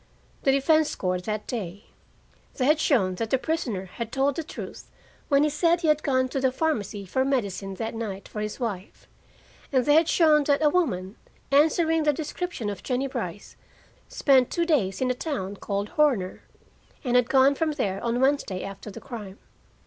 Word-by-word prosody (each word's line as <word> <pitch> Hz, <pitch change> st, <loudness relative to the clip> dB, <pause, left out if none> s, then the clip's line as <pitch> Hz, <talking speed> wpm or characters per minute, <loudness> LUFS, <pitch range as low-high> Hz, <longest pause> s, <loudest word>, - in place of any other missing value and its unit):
The 270 Hz, -, +3 dB
defense 305 Hz, +3 st, +3 dB
scored 180 Hz, -1 st, -2 dB
that 215 Hz, -1 st, -3 dB
day. 200 Hz, -4 st, -5 dB, 0.7 s
They 255 Hz, -, 0 dB
had 305 Hz, +3 st, +4 dB
shown 220 Hz, -12 st, +2 dB
that 225 Hz, +2 st, -2 dB
the 265 Hz, -, +3 dB
prisoner 250 Hz, -, -2 dB
had 220 Hz, +5 st, -6 dB
told 275 Hz, 0 st, +1 dB
the 330 Hz, -, -3 dB
truth -, -, -9 dB, 0.4 s
when 280 Hz, -1 st, +4 dB
he 300 Hz, -, +3 dB
said 335 Hz, +3 st, +2 dB
he 325 Hz, -, +1 dB
had 305 Hz, 0 st, +3 dB
gone 260 Hz, -3 st, +1 dB
to 270 Hz, -, -2 dB
a -, -, -1 dB
pharmacy 225 Hz, -9 st, -2 dB
for 260 Hz, +8 st, 0 dB
medicine 200 Hz, -8 st, -2 dB
that 225 Hz, +4 st, -4 dB
night 210 Hz, -4 st, -5 dB
for 210 Hz, -, -6 dB
his 210 Hz, +3 st, -4 dB
wife; 205 Hz, -6 st, -5 dB, 0.6 s
and 260 Hz, -3 st, +2 dB
they 290 Hz, -, +4 dB
had 320 Hz, +1 st, +4 dB
shown 310 Hz, -3 st, +5 dB
that 285 Hz, +1 st, +2 dB
a 300 Hz, -, +6 dB
woman, 215 Hz, -, -1 dB, 0.3 s
answering 320 Hz, +3 st, +3 dB
the 300 Hz, -1 st, +3 dB
description 315 Hz, -4 st, -4 dB
of 200 Hz, -2 st, -4 dB
Jennie 255 Hz, +1 st, -1 dB
Brice, 270 Hz, -, -5 dB, 0.5 s
spent 265 Hz, -3 st, +3 dB
two 340 Hz, -, 0 dB
days 225 Hz, -, +1 dB
in 255 Hz, -1 st, +2 dB
a -, -, +1 dB
town 240 Hz, -, -4 dB
called 200 Hz, +1 st, -3 dB
Horner, 255 Hz, -12 st, +1 dB, 0.6 s
and 250 Hz, -3 st, 0 dB
had 245 Hz, -1 st, +4 dB
gone 270 Hz, +1 st, +5 dB
from 310 Hz, +2 st, -1 dB
there 200 Hz, -9 st, -2 dB
on 235 Hz, +1 st, 0 dB
Wednesday 265 Hz, -9 st, +1 dB
after 195 Hz, +2 st, -8 dB
the 195 Hz, -, -9 dB
crime. 215 Hz, -7 st, -8 dB
260 Hz, 185 wpm, -26 LUFS, 205-300 Hz, 0.7 s, a